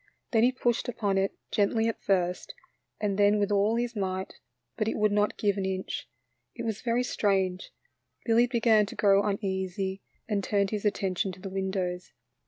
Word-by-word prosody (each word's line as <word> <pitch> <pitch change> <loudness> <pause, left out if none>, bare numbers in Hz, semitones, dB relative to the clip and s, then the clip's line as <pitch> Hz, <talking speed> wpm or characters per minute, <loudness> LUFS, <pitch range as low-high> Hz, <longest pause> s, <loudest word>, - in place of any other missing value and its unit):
Then 225 - +4
he 245 +2 +5
pushed 245 -1 0
upon 205 -5 0
it, 195 0 -1 0.2
gently 225 +2 +2
at 230 - -3
first, 180 -2 0 0.4
and 205 -1 -1
then 205 +1 +5
with 205 0 0
all 205 +2 +3
his 240 0 -2
might, 190 -2 -3 0.4
but 215 - -1
it - - -1
would 210 -1 +2
not 210 0 +1
give 205 -1 +1
an 190 - -1
inch. 190 -9 -4 0.5
It - - -5
was 220 -2 -3
very 240 0 +1
strange; 190 -5 0 0.6
Billy 235 +1 +4
began 225 -4 +3
to - - -8
grow 200 -1 +4
uneasy 190 -1 -2 0.3
and 205 -3 -1
turned 200 0 +1
his 215 -1 -3
attention 195 -2 0
to 185 - -12
the 195 0 -7
windows. 190 -2 -3
205 Hz, 180 wpm, -28 LUFS, 190-220 Hz, 0.6 s, he